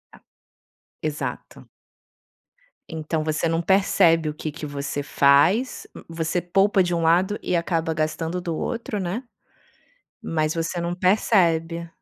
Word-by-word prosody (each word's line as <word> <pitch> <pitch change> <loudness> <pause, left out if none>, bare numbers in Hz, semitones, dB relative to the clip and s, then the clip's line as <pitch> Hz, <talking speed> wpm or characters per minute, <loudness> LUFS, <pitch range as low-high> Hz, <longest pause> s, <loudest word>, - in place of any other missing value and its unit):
A - - -18 0.8
Exato. 155 -1 -5 1.2
Então 160 -1 -3
você 155 +1 0
não 165 +1 0
percebe 170 -3 +3
o 150 - -4
que 155 0 -5
que 150 +1 -7
você 145 0 -4
faz. 145 - +3
M - - -10
Você 165 +1 -1
poupa 195 +3 +3
de 175 -1 0
um 170 - -1
lado 180 +5 +2
e 180 - 0
acaba 165 -1 0
gastando 160 +3 -2
do 170 -2 -3
outro, 230 -1 -3
né? 190 +7 -3 1.0
Mas 155 -1 -1
você 165 +1 -2
não 170 +1 -2
percebe. 170 -3 +2
165 Hz, 135 wpm, -23 LUFS, 160-180 Hz, 1.2 s, percebe